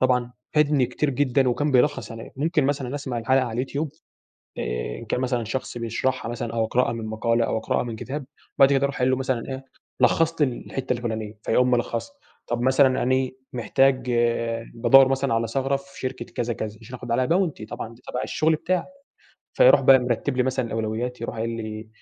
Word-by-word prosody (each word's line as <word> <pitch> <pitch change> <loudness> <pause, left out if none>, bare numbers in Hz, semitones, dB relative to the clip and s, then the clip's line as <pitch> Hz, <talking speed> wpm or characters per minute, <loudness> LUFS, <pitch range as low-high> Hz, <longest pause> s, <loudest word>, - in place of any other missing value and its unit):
طبعًا 125 -1 +2 0.2
فادني 150 -4 +3
كتير 140 +4 -1
جدًا 135 0 +2
وكان 145 +5 0
بيلخّص 140 0 +2
عليّا. 115 0 -9
ممكن 155 +1 +1
مثلًا 135 -2 -1
أسمع 130 -4 -3
الحلقة 130 +3 +2
على 120 - -5
اليوتيوب 135 +6 -2 0.7
آآ - - -3
إن - - -9
كان - - -1
مثلًا 125 -2 0
شخص 120 +2 -4
بيشرحها 120 +1 -2
مثلًا 115 -1 -4
أو 115 -1 +1
أقرأها 120 +1 +1
من 115 -1 -5
مقالة 115 +2 +1
أو - - -1
أقرأها 110 - 0
من 120 -2 -5
كتاب 135 +5 -5 0.3
وبعد 135 0 +6
كده 135 0 +2
أروح 140 -1 -3
قايل 125 +1 +2
له 130 - +2
مثلًا 130 -2 -1
إيه، 135 0 -6 0.4
لخّص 165 +6 +3
لي 145 - +5
ال 125 - -6
الحتّة 130 -1 -2
الفُلانية، 110 -3 -4
فيقوم 125 +2 +2
ملخّصها. 120 - -1 0.3
طب 120 0 -1
مثلًا 130 +1 +4
أنا 130 +1 +2 0.2
محتاج 130 +1 +2 0.6
بادوّر 125 +3 +6
مثلًا 135 -1 0
على 115 0 +1
ثغرة 135 +4 0
في 140 0 -9
شركة 130 0 -4
كذا، 120 0 -3
كذا 110 -1 -5
يشرحه 125 +3 -9
ب - - -4
علي 125 +2 +2
bounty 165 - 0
طبعًا 115 +1 -6
دي 120 - -21
تبع 125 - -4
الشغل 160 +1 +1
بتاعه. 180 +3 -1 0.7
فيروح - - +6
بقى 135 -1 +7
مرتِّب 125 +2 -1
لي 125 - +3
مثلًا 130 -1 0
الأولويات، 115 +2 -3
يروح 115 - -4
قايل 115 +1 -1
لي: 110 -1 -5
125 Hz, 195 wpm, -24 LUFS, 115-135 Hz, 0.7 s, بقى